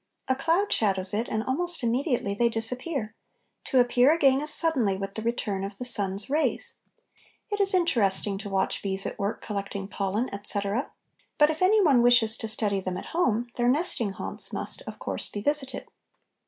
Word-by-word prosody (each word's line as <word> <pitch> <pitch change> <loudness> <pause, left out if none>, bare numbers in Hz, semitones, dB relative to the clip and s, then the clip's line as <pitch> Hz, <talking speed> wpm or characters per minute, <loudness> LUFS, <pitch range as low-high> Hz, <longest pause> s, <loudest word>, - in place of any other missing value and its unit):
A 260 - +1
cloud 335 +9 0
shadows 190 -3 +1
it, 225 +3 -2
and 220 0 -2
almost 330 +3 -1
immediately 240 -3 -1
they 235 +3 +1
disappear, 230 +1 -2 0.5
to 260 - +1
appear 245 +2 +3
again 275 -4 +2
as 300 0 0
suddenly 275 - +1
with 195 0 -6
the 220 - -6
return 215 -4 -3
of 200 0 -7
the 250 - -5
sun's 200 -4 +1
rays. 300 +3 -1 0.7
It 410 - -3
is 395 -1 +1
interesting 205 - +1
to 205 0 -7
watch 195 -1 -1
bees 195 -1 +1
at - - -6
work 200 +2 -4
collecting 200 -2 -5
pollen, 200 +5 -3
etc., 200 +4 +3 0.5
but 300 0 +4
if 315 - -7
any 410 +3 +3
one 275 -8 +3
wishes 235 -2 +4
to 225 - -5
study 210 -2 0
them 185 -1 -5
at - - -8
home, 245 -9 -1
their 240 0 +1
nesting 260 - +1
haunts - - +4
must, - - +1
of - - -8
course, - - -2
be 205 - -7
visited. 280 -2 -1
235 Hz, 180 wpm, -25 LUFS, 200-285 Hz, 0.7 s, but